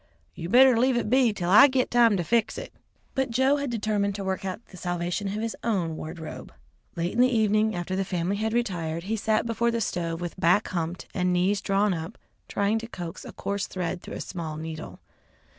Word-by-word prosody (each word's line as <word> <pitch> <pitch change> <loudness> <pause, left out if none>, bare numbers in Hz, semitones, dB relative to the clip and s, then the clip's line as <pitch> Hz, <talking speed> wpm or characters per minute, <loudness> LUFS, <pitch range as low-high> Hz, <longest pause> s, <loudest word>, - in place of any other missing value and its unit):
You 170 0 -6
better 255 +3 +7
leave 255 0 +3
it 230 - -1
be 255 -3 +5
'til 180 -4 -2
I 245 +8 +9
git 260 -2 0
time 235 -4 +5
to 175 - -1
fix 230 +6 +1
it." - - -7 0.4
But 265 -1 0
Joe 265 +4 +3
had 280 -1 -2
determined 210 -3 0
to 200 - -4
work 190 +1 -2
out 190 +4 -5
the - - -13
salvation 175 +3 -2
of 195 - -3
his 230 - -3
own 185 -8 0
wardrobe. 160 +1 -7 0.4
Late 170 +1 -2
in 235 - -2
the 250 - +7
evening 215 -2 +2
after 175 +1 -3
the 195 - 0
family 185 +1 -1
had 220 +1 -1
retired, 170 -8 -1
he 215 +4 -1
sat 220 +1 +1
before 235 +1 +1
the 230 0 0
stove 170 -5 -2
with 175 +1 -6
back 180 +4 +3
humped 170 0 -3
and 180 -1 +1
knees 185 +3 +2
drawn 200 0 +2
up 165 +5 -6 0.3
trying 205 +2 +1
to 230 - -7
coax 175 -7 -7
a - - -8
coarse 200 0 -3
thread 180 -1 -3
through - - -8
a - - -5
small 160 -4 -5
needle. 160 0 -7
200 Hz, 215 wpm, -26 LUFS, 175-230 Hz, 0.4 s, I